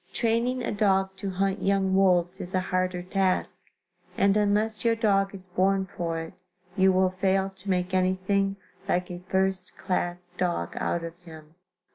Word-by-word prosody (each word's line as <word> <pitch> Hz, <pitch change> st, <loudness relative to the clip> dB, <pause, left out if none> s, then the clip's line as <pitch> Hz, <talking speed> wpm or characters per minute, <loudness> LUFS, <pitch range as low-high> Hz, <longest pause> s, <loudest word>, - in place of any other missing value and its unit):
Training 240 Hz, +2 st, 0 dB
a -, -, -1 dB
dog 195 Hz, -2 st, +1 dB
to 195 Hz, -, -4 dB
hunt 195 Hz, +1 st, -1 dB
young 195 Hz, -1 st, +2 dB
wolves 185 Hz, -1 st, +3 dB
is 180 Hz, +1 st, -5 dB
a -, -, +3 dB
harder 185 Hz, -1 st, -1 dB
task, 185 Hz, 0 st, -1 dB, 0.5 s
and 200 Hz, 0 st, +4 dB
unless 210 Hz, +1 st, +1 dB
your 230 Hz, -1 st, +3 dB
dog 195 Hz, -3 st, +2 dB
is 190 Hz, -2 st, -10 dB
born 190 Hz, +1 st, +1 dB
for 165 Hz, -1 st, -2 dB
it, 165 Hz, +2 st, -7 dB, 0.4 s
you 190 Hz, 0 st, +5 dB
will 185 Hz, 0 st, +3 dB
fail 190 Hz, +1 st, +1 dB
to 195 Hz, +2 st, -9 dB
make 180 Hz, 0 st, 0 dB
anything 185 Hz, +2 st, +1 dB, 0.3 s
like 180 Hz, 0 st, 0 dB
a 175 Hz, -, -6 dB
first 190 Hz, -1 st, 0 dB
class 180 Hz, -1 st, -2 dB
dog 175 Hz, -, -1 dB
out 170 Hz, -, -1 dB
of 165 Hz, 0 st, -6 dB
him. 160 Hz, -3 st, -13 dB
190 Hz, 165 wpm, -27 LUFS, 180-195 Hz, 0.5 s, you